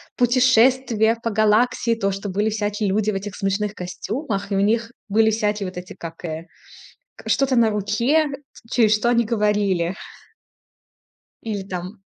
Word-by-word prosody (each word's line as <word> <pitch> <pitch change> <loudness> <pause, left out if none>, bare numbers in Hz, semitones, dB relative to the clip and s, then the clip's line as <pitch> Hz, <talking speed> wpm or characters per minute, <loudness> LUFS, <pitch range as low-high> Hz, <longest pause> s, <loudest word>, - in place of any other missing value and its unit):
путешествия 245 -2 +3
по 230 - -1
Галактике. 225 +2 +2
То, 195 -1 +1
что 195 +1 -5
были 205 +3 0
всякие 210 -1 -1
люди 215 +2 +1
в - - -5
этих 200 +1 -5
смешных 200 +1 -1
костюмах 200 - -4
и - - +1
у - - +2
них 230 +3 +1 0.2
были 220 +2 +4
всякие 210 -2 -1
вот 185 - -8
эти, 180 0 -7
как, 165 0 -9
э, 160 0 -5 0.7
к - - -11
что-то 270 -2 +2
на 230 -2 +4
руке, 220 +10 +1 0.4
через 220 -4 +4
что 215 +3 +1
они 235 -1 +3
говорили. 205 -5 0 1.5
Или 210 -3 -3
там 185 +2 -7
210 Hz, 155 wpm, -22 LUFS, 195-230 Hz, 1.5 s, были